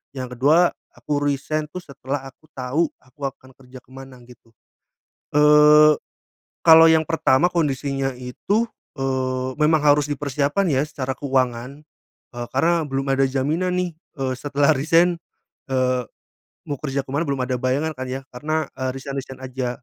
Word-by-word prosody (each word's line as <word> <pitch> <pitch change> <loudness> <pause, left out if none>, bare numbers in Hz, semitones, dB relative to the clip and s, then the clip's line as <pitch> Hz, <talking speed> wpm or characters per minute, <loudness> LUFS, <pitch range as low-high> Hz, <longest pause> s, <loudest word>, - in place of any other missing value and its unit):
Yang 125 -2 -6
ke-2 160 +7 +4 0.2
aku - - -5
resign, 145 +2 -1
tuh, 180 +4 -7
setelah 140 0 -5
aku 135 - -25
tau 135 +5 0
aku 130 +2 -29
akan 130 -1 -20
kerja 130 0 -14
ke - - -31
mana, 135 -1 -11
gitu. 120 -1 -18 0.9
Eee, 150 0 +7 0.7
kalau 160 0 +9
yang 160 -1 +3
pertama 160 0 +3
kondisinya 140 -5 -1
itu, 200 - -1 0.3
eee, 130 -1 -1
memang 155 +1 +3
harus 145 0 +4
dipersiapkan, 145 +6 0
ya, 140 0 +1
secara 135 -3 -4
keuangan, 130 0 -1 0.6
eee, 120 0 -4
karena 165 +4 +2
belum 135 -1 -3
ada 135 0 +3
jaminan, 150 +7 -1
nih, 180 -1 -1 0.3
eee, 130 -1 -1
setelah 145 +2 +2
resign, 165 +5 +3 0.5
eee, 130 -1 +1 0.7
mau 145 -2 -3
kerja 140 -2 -2
ke - - -19
mana 145 +4 0
belum 140 -2 -1
ada 125 0 -1
bayangan, 135 +5 0
kan, 130 - -4
ya, 130 +1 -4
karena, 155 +5 -2
eee, 130 0 -2
resign 135 +1 -6
resign 130 -1 -10
aja. 130 -1 -3
140 Hz, 155 wpm, -22 LUFS, 130-150 Hz, 0.9 s, kalau